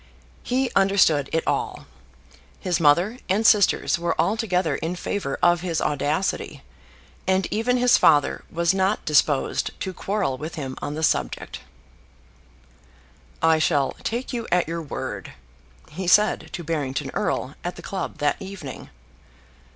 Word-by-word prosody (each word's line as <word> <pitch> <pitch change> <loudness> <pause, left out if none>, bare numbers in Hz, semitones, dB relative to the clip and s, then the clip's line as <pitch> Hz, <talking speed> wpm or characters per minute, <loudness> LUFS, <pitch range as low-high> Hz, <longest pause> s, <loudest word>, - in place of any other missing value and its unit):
He 255 0 0
understood 190 -8 +3
it 160 - 0
all. - - -2 0.7
His 175 -3 -1
mother 175 +10 +3
and 205 +4 +1
sisters 205 -3 +4
were 170 0 -1
altogether 185 -8 +1
in 170 +2 -3
favour 175 -5 -3
of 175 -1 +4
his 170 -3 -1
audacity, 150 +5 -1 0.6
and 190 0 +2
even 235 +4 +1
his 245 0 +4
father 145 -2 +3
was 170 +1 +1
not 190 +2 0
disposed 145 -2 +1
to 190 - -4
quarrel 195 -10 -2
with 155 +2 -6
him 135 -4 -5
on 145 - -4
the 160 - -4
subject. 65 - -1 1.8
"I 160 -1 +5
shall 145 -4 +2
take 240 +4 -3
you 235 -2 -3
at 180 -2 +2
your 165 +1 -3
word," 150 - -6 0.6
he 185 -1 -5
said 210 +4 +3
to 175 - -5
Barrington 145 -4 -2
Erle 130 - -1
at 175 - -4
the - - -11
club 195 -1 -4
that 145 0 +1
evening. 190 -8 -8
175 Hz, 140 wpm, -24 LUFS, 150-195 Hz, 1.8 s, I